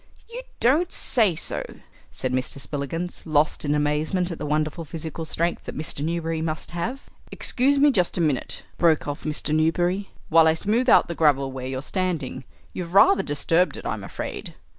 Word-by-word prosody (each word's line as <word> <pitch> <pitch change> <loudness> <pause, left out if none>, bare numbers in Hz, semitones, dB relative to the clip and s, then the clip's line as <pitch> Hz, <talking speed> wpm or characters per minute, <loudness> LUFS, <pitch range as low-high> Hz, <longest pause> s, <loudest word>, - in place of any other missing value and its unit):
"You 475 +2 -7 0.2
don't 310 +9 +3
say 215 -8 +2
so!" - - -2 0.5
said 130 -1 -3
Mr. 130 +2 -1
Spillikins, 150 +6 -4
lost 155 -1 +1
in 145 0 +1
amazement 150 +5 0
at 165 - -6
the - - -4
wonderful 155 +2 -1
physical 160 +1 -6
strength 170 +2 -1
that - - -7
Mr. 150 -1 -4
Newberry 165 0 -2
must 155 -1 -3
have. 225 +11 -4 0.3
"Excuse 275 +3 +2
me 290 +1 +5
just 180 -8 +1
a - - 0
minute," 150 -6 -1 0.2
broke 165 -4 +3
off 145 +2 -5
Mr. 155 0 -1
Newberry, 175 +5 +1 0.2
"while 165 0 +6
I 160 - +4
smooth 225 +9 +1
out - - +6
the 170 - -3
gravel 140 -4 +2
where 130 -1 -5
you're 130 +1 -4
standing. 170 -8 -3 0.3
You've 175 0 -6
rather 200 -1 +6
disturbed 165 +3 +1
it, - - -9
I'm - - -3
afraid." - - -6
165 Hz, 180 wpm, -24 LUFS, 150-185 Hz, 0.5 s, while